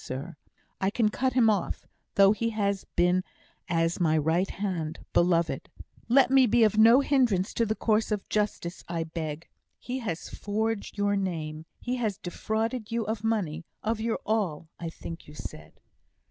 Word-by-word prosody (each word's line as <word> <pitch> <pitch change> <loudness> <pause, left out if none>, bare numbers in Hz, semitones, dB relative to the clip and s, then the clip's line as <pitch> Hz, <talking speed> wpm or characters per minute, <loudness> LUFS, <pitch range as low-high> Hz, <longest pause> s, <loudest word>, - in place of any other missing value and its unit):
Sir, 130 +3 -6 0.4
I 190 - +2
can 215 +1 +2
cut 255 +3 0
him 245 -3 +4
off, 205 -4 0 0.3
though 195 -1 +7
he 230 +2 0
has 200 -3 -1
been 180 +1 +3 0.4
as 165 0 +1
my 160 -3 +3
right 160 +5 +1
hand 175 -6 -3
beloved. 170 -2 +2 0.4
Let 260 +1 +5
me 265 -2 +6
be 230 0 +5
no 230 +5 +7
hindrance 245 -9 +2
to 230 - +1
the 220 - 0
course 220 0 +1
of 210 -2 -2
justice, 205 -4 -2
I 170 -1 -1
beg. 160 -1 -5 0.3
He 255 +2 -4
has 190 -9 -4
forged 215 +1 -3
your 205 0 +2
name 160 -5 -3
he 250 +1 -2
has 215 -5 -1
defrauded 220 +4 -3
you 230 -1 0
of 215 0 -3
money 185 -8 -1 0.2
of 220 0 -1
your 225 0 0
all, 185 -8 -1
I 170 - -4
think 165 0 -9
you 150 - -12
said." - - -9
205 Hz, 165 wpm, -28 LUFS, 170-225 Hz, 0.4 s, though